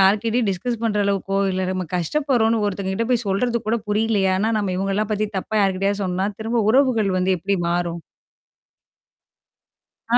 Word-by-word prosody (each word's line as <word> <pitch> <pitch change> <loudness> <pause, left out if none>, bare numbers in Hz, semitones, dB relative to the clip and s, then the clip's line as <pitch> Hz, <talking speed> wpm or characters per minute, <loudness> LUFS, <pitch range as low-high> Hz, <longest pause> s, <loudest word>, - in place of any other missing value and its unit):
யார்கிட்டயும் 215 +4 +3
டிஸ்கஸ் 225 +5 -3
பண்ற 210 -2 +1
அளவுக்கோ 195 0 0
இல்ல. 185 0 -1
நம்ம 185 -1 -2
கஷ்டப்படுறோம்ன்னு 225 - +1
ஒருத்தங்க 195 -1 -2
கிட்ட 230 +4 -1
போய் 245 -1 +1
சொல்றது 235 +5 +1
கூட 225 +2 +2
புரியலையா? 210 -2 +1
ஆனா, 215 - +1
நம்ம 200 -3 -1
இவங்கலாம் 195 +3 -1
பத்தி 215 0 0
தப்பா 205 - -6
யார்கிட்டயாவது 195 +1 +1
சொன்னா, 185 +1 -1
திரும்ப 225 +2 0
உறவுகள் 245 -5 +3
வந்து 185 0 +1
எப்படி 200 +4 -1
மாறும்? 170 -1 -2 2.1
ஆ - - +8
200 Hz, 155 wpm, -22 LUFS, 190-225 Hz, 2.1 s, ஆ